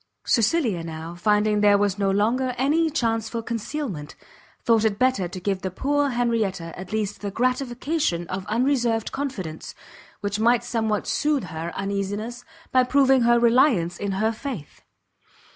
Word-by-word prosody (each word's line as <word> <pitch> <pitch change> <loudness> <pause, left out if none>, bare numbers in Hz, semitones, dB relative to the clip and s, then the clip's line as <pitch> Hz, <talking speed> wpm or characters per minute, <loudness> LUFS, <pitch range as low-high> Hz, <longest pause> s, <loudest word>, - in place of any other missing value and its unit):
Cecilia 230 - +2
now, 165 0 -6
finding 210 +3 +2
there 205 -1 +6
was 200 -1 0
no 200 -1 +2
longer 240 +6 +1
any 310 +5 +2
chance 225 -7 -1
for 230 0 -4
concealment, 225 - -4 0.5
thought 225 -2 +3
it 215 -2 +1
better 255 -7 +2
to 185 +2 -7
give 190 0 -2
the 190 - -2
poor 285 +9 0
Henrietta 220 -9 -1
at 185 0 -9
least 210 -2 -2
the 205 - -3
gratification 250 - -1
of 190 0 -4
unreserved 235 -1 +1
confidence, 200 - -5 0.5
which 205 +1 -2
might 235 +1 +3
somewhat 220 -3 -1
sooth 295 -4 0
her 165 0 -5
uneasiness 200 +5 -3 0.3
by 255 0 +5
proving 265 0 +4
her 235 0 +4
reliance 230 - +3
in 200 -1 -2
her 215 +3 +1
faith. 225 - -7
220 Hz, 150 wpm, -24 LUFS, 195-250 Hz, 0.5 s, there